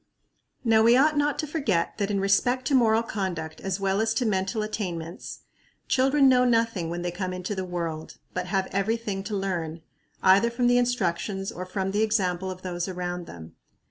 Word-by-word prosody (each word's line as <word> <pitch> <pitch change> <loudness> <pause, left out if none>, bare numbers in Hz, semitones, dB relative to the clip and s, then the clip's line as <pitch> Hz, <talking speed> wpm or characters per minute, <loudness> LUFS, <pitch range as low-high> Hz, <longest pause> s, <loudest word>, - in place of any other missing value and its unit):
Now 225 -2 +4
we 235 +2 +6
ought 300 +3 +4
not 290 0 +1
to 310 - -1
forget 280 - -1
that 200 -1 0
in 200 -1 0
respect 245 +6 +2
to 280 - 0
moral 230 -3 +4
conduct 180 -8 -4
as 195 0 -2
well 195 +1 +1
as 225 0 0
to 245 - +1
mental 195 0 0
attainments 180 -6 -5 0.5
children 270 +1 +4
know 250 -1 +5
nothing 230 -8 +1
when 175 +1 -4
they 175 - -2
come 185 +1 -4
into 185 +2 -4
the 190 -2 -3
world, 170 -3 -5 0.2
but 180 0 -3
have 190 0 0
every 200 +4 0
thing 205 -4 -4
to 210 -1 -2
learn, 170 -4 -3 0.4
either 195 +5 +5
from 240 +1 -1
the 245 0 +5
instructions 195 -5 -1
or 185 +1 -7
from 190 0 -2
the 205 +2 0
example 190 -4 0
of 185 0 -8
those 175 -1 -3
around 180 -1 -4
them. 80 -1 -11
195 Hz, 195 wpm, -26 LUFS, 180-230 Hz, 0.5 s, we